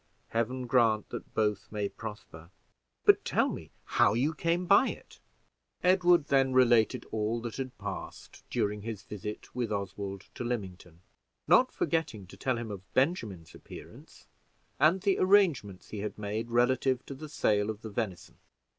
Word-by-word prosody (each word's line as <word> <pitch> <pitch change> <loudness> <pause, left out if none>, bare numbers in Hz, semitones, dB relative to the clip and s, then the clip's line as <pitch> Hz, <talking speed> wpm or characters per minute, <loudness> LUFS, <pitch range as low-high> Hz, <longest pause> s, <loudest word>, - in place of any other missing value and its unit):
Heaven 125 +3 -1
grant 115 -4 +2
that - - -8
both 105 -2 0
may 105 -1 -1
prosper! 100 -7 -9 0.6
But - - +6
tell - - +1
me - - -7 0.2
how - - +3
you 140 +7 +1
came 170 +3 0
by 200 +8 +6
it." - - -8 0.6
Edward 180 -3 +4
then 135 -1 +3
related 120 -3 +4
all 110 +2 -1
that 115 -1 -6
had 130 -2 -5
passed - - -8
during 105 0 -1
his 105 -2 -6
visit 105 +1 -7
with 120 -3 -2
Oswald 100 -1 -4
to - - -5
Lymington, 95 -8 -5 0.5
not - - +5
forgetting 140 - -1
to 90 - -13
tell 130 -2 -1
him 115 -2 -5
of 100 -1 -9
Benjamin's 115 - 0
appearance, - - -13 0.5
and 160 +6 +4
the 195 -1 +2
arrangements 170 - +3
he 105 - -6
had 105 +1 -4
made 105 +2 -3
relative 125 +2 +2
to - - -7
the 150 +3 -9
sale 105 -6 +1
of 110 0 -5
the 110 - -5
venison. 100 -5 -4
115 Hz, 155 wpm, -30 LUFS, 105-135 Hz, 0.6 s, But